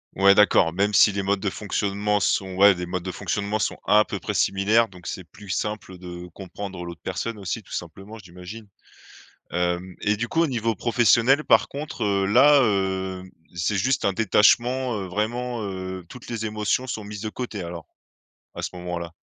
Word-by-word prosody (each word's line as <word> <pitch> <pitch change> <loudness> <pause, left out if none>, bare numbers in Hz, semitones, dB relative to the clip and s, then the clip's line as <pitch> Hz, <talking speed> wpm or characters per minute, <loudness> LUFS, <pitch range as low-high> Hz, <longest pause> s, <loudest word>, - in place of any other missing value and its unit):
Ouais, 100 +1 +6
d'accord 95 -5 +4
même 100 +3 +1
si 105 - +6
les 100 0 -2
modes 100 0 +1
de 100 - -1
fonctionnement 105 +1 -1
sont 95 -1 0
ouais 100 +1 +6
des 90 0 -4
modes 90 +1 -3
de 95 +1 -5
fonctionnement 100 +3 -2
sont 110 - -2
à 105 +1 +5
peu - - -5
près - - -4
similaires 105 +4 +3
donc 90 -3 -13
c'est 95 - -5
plus 100 +3 -15
simple 105 -1 -3
de 90 -1 -8
comprendre 95 -1 -7
l'autre 85 -1 -9
personne 105 +4 -4
aussi 95 -5 -4
tout - - -19
simplement, 95 +6 -7
j'imagine. 90 +4 -11 0.8
Hem, 90 +2 -2
et 105 0 +1
du 120 +3 -3
coup 165 - 0
au 170 - +4
niveau 115 -5 -1
professionnel 120 +5 +3
par - - +4
contre, 140 -5 -5
heu, 100 -1 +1
là, 145 +9 +6
heu, 95 -3 -1 0.3
c'est 85 +4 -1
juste 130 +6 +1
un 100 - +1
détachement, 120 +5 +3
heu, 95 - -4
vraiment, 120 +5 -2
heu, 95 -2 -5
toutes 125 +3 -12
les 115 -2 -3
émotions 105 +4 -1
sont 110 -4 -5
mises 105 0 -7
de 110 - -3
côté 110 -2 -5
alors, 85 -1 -7 0.7
à - - -6
ce - - -3
moment-là? 90 -1 -5
100 Hz, 190 wpm, -24 LUFS, 95-110 Hz, 0.8 s, Ouais